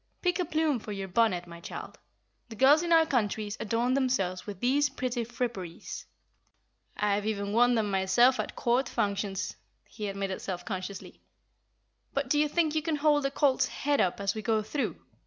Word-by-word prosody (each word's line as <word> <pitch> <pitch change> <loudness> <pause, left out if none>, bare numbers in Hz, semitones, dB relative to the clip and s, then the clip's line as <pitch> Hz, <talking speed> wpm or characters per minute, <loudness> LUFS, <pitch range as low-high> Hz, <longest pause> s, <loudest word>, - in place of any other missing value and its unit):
"Pick 360 0 +1
a 360 - +1
plume 310 -5 +1
for 215 - -8
your 195 -1 -4
bonnet, 185 -3 +2
my 170 -1 -11
child. - - -8 0.5
The 225 - -8
girls 280 +7 +6
in 345 -1 -2
our 325 -1 +6
countries 215 -6 -1
adorn 235 +3 0
themselves 230 -10 0
with 200 -3 -6
these 285 +5 +2
pretty 250 -2 -2
fripperies. 220 -8 -5 0.9
I've 205 0 +1
even 200 -1 -2
worn 245 +2 +5
them 215 -3 0
myself 215 +7 +4
at - - -3
court 245 +2 +1
functions," 200 -1 -2 0.3
he 210 -2 -6
admitted 195 -1 -3
self 180 -2 -5
consciously. 190 -1 -6 0.9
"But - - -1
do 295 - +4
you 300 - +3
think 315 -1 +1
you 310 - +1
can 320 0 -1
hold 295 -1 +3
the - - +2
colt's 275 -1 +2
head 285 0 0
up 180 - 0
as 200 0 0
we 220 - -5
go 215 0 +1
through? 275 +7 -2
230 Hz, 180 wpm, -29 LUFS, 200-275 Hz, 0.9 s, girls